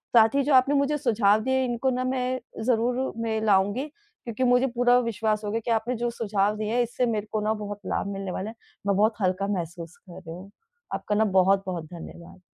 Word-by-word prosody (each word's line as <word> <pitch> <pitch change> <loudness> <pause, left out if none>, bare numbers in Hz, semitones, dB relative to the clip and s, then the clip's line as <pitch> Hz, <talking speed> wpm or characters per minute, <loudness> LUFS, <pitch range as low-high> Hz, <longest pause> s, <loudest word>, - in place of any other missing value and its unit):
साथ 225 +1 +6
ही 280 - +3
जो 285 +1 +1
आपने 265 +2 +5
मुझे 280 +1 +2
सुझाव 220 -6 +3
दिए, 260 +1 +1
इनको 245 +2 0
ना 255 0 -1
मैं 255 0 -1 0.3
ज़रूर 250 +2 +1
में 220 -1 -1
लाऊँगी 205 +5 +2
क्योंकि 315 - -7
मुझे 250 +1 +4
पूरा 245 0 +4
विश्वास 220 -2 -1
हो 205 - -2
गया 225 - 0
कि 235 - 0
आपने 230 +2 0
जो 240 +1 -1
सुझाव 210 -3 0
दिए 215 +1 -2
हैं, 245 - +3
इससे 240 +2 -1
मेरे 215 -3 -2
को 215 - -1
ना 215 - +2
बहुत 205 -1 -6
लाभ 200 - -2
मिलने 195 -1 -4
वाला 190 +4 -4
है। 225 - -10 0.3
मैं 200 - +3
बहुत 215 +3 +3
हल्का 185 +1 0
महसूस 170 0 -7
कर 180 -4 -14
रही 165 -3 -9
हूँ। 190 +3 -11 0.4
आपका 210 - -2
ना 220 +1 +3
बहुत-बहुत 185 -3 +1
धन्यवाद। 170 +1 -11
220 Hz, 215 wpm, -26 LUFS, 200-250 Hz, 0.4 s, साथ